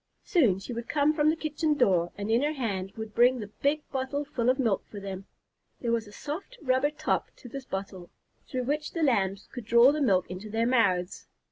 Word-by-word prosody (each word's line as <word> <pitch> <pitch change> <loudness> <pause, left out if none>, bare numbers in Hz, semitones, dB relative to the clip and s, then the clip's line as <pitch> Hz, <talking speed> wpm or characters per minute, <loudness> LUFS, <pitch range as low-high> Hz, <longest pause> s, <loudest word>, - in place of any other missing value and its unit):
Soon 250 - +3
she 195 +5 -7
would 235 0 -6
come 295 +1 +3
from 305 -1 +3
the 315 - +2
kitchen 310 -1 -1
door 180 -10 +2
and 205 +2 -3
in 230 +2 +4
her 300 +2 +1
hand 200 -9 -3
would 220 -1 -6
bring 245 +3 +5
the 205 -2 -7
big 295 +2 +1
bottle 270 +2 -2
full 245 -4 0
of 255 - +3
milk 230 -8 +1
for 205 - -8
them. 195 -1 -6 0.5
There 235 - -1
was 230 -2 0
a - - -12
soft 325 - -7
rubber 260 +1 +2
top 300 - -1
to - - -13
this 265 +2 -7
bottle, 190 -4 -6 0.4
through 255 -3 -2
which 295 +4 -2
the 330 - -1
Lambs 200 -7 +1
could 245 -4 -7
draw 235 +4 +6
the 300 +1 -2
milk 190 -9 +3
into 190 +4 -7
their 225 +2 0
mouths. 200 -8 +1
240 Hz, 220 wpm, -28 LUFS, 200-285 Hz, 0.5 s, draw